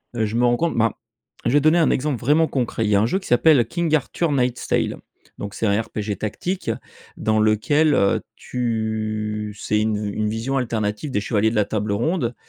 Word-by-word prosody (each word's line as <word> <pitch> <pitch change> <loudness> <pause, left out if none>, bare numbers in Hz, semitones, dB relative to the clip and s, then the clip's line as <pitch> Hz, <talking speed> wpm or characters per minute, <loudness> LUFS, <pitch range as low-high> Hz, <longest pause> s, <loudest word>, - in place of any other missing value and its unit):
Heu, 110 - +1
je 105 +1 -4
me 120 +1 +3
rends 120 0 +3
compte, 170 +3 0
ben, 115 0 +3 0.5
je - - +2
vais 145 - +5
donner 155 +4 +4
un 165 - +4
exemple 135 -2 0
vraiment 150 +6 +3
concret. 120 -5 -1
Il - - 0
y 105 - +3
a 100 - +4
un - - +3
jeu 160 +12 0
qui 190 - -11
s'appelle 125 0 +5
King 170 +4 -1
Arthur 155 +3 -1
Nightstale. 125 -3 0 0.4
Donc 100 0 -6
c'est - - -2
un 100 +1 +2
RPG 105 -3 -4
tactique 175 - -3 0.5
dans 110 0 +1
lequel, 145 +9 +3
heu, 100 - +2
tu 110 -3 -3
c'est 105 +1 0
une 110 0 +1
une 105 +1 -2
vision 115 +5 -2
alternative 110 0 -2
des 105 - 0
chevaliers 110 0 +1
de 115 - -4
la 105 -1 +3
Table 105 0 -2
ronde 125 - 0
115 Hz, 205 wpm, -22 LUFS, 105-140 Hz, 0.5 s, vais